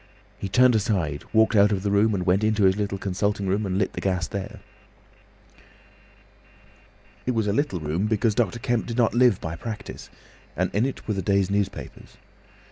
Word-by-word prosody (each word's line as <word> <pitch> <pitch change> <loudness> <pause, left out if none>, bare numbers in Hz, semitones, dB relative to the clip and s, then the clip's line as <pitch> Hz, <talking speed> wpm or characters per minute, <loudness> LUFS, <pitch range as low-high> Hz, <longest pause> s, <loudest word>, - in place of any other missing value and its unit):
He 100 - -4
turned 125 +5 +5
aside, 95 - -1
walked 110 +1 +3
out 105 0 +5
of 95 -2 -1
the 100 - 0
room, 105 +1 +3
and 90 -2 -2
went 95 +3 +2
into 110 -1 +2
his 95 0 +4
little 100 -1 -2
consulting 100 +1 -2
room 100 +2 0
and 95 0 -1
lit 95 -1 0
the - - -5
gas 90 -2 -1
there. 100 -1 -6 2.7
It 125 - 0
was 110 -2 +1
a 100 - 0
little 125 -7 0
room, 80 +6 -1
because 110 0 +1
Dr. 115 -2 0
Kemp 120 0 -1
did 115 0 -4
not 120 -2 +3
live 120 -4 +4
by 80 0 -5
practice, 110 +4 -7 0.5
and - - -1
in 110 +6 +2
it 135 - -7
were 105 - 0
the 95 - -2
day's 100 0 +1
newspapers. 100 -1 -4
100 Hz, 190 wpm, -24 LUFS, 95-110 Hz, 2.7 s, turned